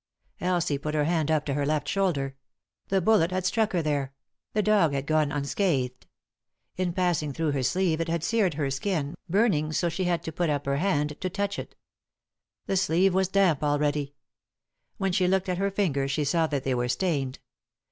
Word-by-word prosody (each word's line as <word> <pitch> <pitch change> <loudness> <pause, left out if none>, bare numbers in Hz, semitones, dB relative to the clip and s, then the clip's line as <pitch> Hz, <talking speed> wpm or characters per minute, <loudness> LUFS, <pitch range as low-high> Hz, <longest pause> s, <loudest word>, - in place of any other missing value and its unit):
Elsie 175 -5 0
put 150 +2 -3
her 150 - +2
hand 160 -1 0
up 155 -2 +1
to 140 - -1
her 145 +1 0
left 150 +1 0
shoulder. 145 -9 0 0.5
The 195 -1 +1
bullet 180 -3 +4
had 185 0 -2
struck 220 +2 +1
her 175 -3 +1
there; 140 -3 -1 0.4
the 210 - +1
dog 200 -8 +3
had 135 0 -2
gone 155 -1 +2
un 145 -1 -2
scathed. 135 -8 -1 0.7
In 185 -1 -1
passing 170 -5 0
through 160 +1 0
her 140 -2 -1
sleeve 165 +3 +1
it 165 - -2
had 165 -1 -1
seared 200 -5 +1
her 140 -2 -1
skin, 150 0 -2 0.2
burning 185 -6 +2
so 165 - 0
that 170 - +1
she 185 +3 -2
had 170 -2 0
to 160 - -4
put 170 +1 -1
up 145 -1 -1
her 140 0 0
hand 150 -4 0
to 185 - -1
touch 200 +1 -2
it. - - -8 0.9
The 195 - 0
sleeve 180 +1 +3
was 190 0 +2
damp 190 -6 +2
already. 145 -1 0 0.8
When 195 -1 0
she 180 0 +2
looked 190 +1 +1
at 180 0 -1
her 200 0 +1
fingers 150 -9 0
she 150 +2 0
saw 160 +3 +2
that 140 -3 -2
they 135 - 0
were 125 0 -1
stained. 140 -5 -1
160 Hz, 205 wpm, -27 LUFS, 145-185 Hz, 0.9 s, bullet